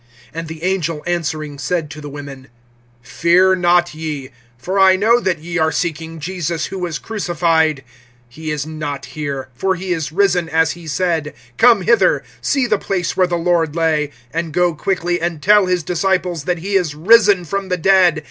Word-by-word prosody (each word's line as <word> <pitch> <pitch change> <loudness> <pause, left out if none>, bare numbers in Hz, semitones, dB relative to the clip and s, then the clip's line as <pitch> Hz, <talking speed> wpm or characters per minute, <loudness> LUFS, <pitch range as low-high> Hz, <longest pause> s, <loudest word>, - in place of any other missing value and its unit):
(5)And 165 +1 -5
the 160 0 -9
angel 170 -5 -1
answering 155 -4 -3
said 155 +1 -2
to 150 - -9
the 145 - -7
women: 140 -2 -9 0.6
Fear 175 +8 +3
not 175 -1 +2
ye; 155 -4 -5 0.3
for 185 +10 -2
I 190 -1 +6
know 225 +5 +3
that 185 -7 -1
ye 170 +3 -4
are 160 0 +2
seeking 165 -1 -3
Jesus, 170 0 -3
who 195 - -6
was 175 -4 -3
crucified. 165 -8 0 0.5
(6)He 155 +2 -5
is 150 -2 -3
not 150 -3 -5
here; 140 -4 -5
for 190 +10 0
he 185 0 -3
is 160 -3 -3
risen, 180 -2 +1
as 160 0 +2
he 170 -1 -10
said. 160 -2 -1 0.2
Come 230 -5 +5
hither, 235 +6 +3 0.2
see 275 -3 +1
the 210 -4 +1
place 180 -4 -2
where 185 -1 +3
the 175 -1 -1
Lord 165 -2 0
lay. 155 -3 +1 0.2
(7)And 165 -1 -2
go 175 0 +2
quickly, 175 +1 -1
and 170 -2 -2
tell 205 +3 +4
his 180 -2 0
disciples 180 -2 -1
that 180 -1 0
he 195 +5 -5
is 175 -6 +1
risen 200 +1 +4
from 195 +4 -3
the 180 - 0
dead. 180 -2 +4
170 Hz, 185 wpm, -18 LUFS, 155-185 Hz, 0.6 s, I